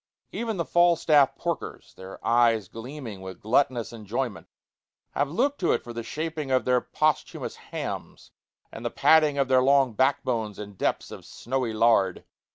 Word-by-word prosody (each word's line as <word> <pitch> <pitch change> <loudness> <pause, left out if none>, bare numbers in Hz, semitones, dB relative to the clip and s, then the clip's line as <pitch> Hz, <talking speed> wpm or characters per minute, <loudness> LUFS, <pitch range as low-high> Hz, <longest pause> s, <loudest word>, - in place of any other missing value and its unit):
Even 225 -3 -3
the 170 - -1
Falstaff 155 -5 +4
porkers, 170 -2 -5
their 95 +1 -10
eyes 115 -4 +3
gleaming 115 -3 -8
with 95 -1 -9
gluttonous 120 +1 +1
enjoyment, 115 0 -4 0.6
have 145 0 -1
looked 270 - 0
to 175 - +2
it - - -1
for 120 - -8
the 115 - -4
shaping 155 +3 -4
of 130 -1 +2
their 125 -1 +3
posthumous 155 -1 -1
hams - - -7 0.4
and - - -9
the - - -1
padding 155 -3 +4
of 135 -1 +2
their 130 -1 +4
long 135 -2 +3
backbones 120 -4 0
in 105 -1 -8
depths 95 - -2
of - - -9
snowy 130 -2 -3
lard. 110 -4 +2
130 Hz, 160 wpm, -26 LUFS, 115-150 Hz, 0.6 s, Falstaff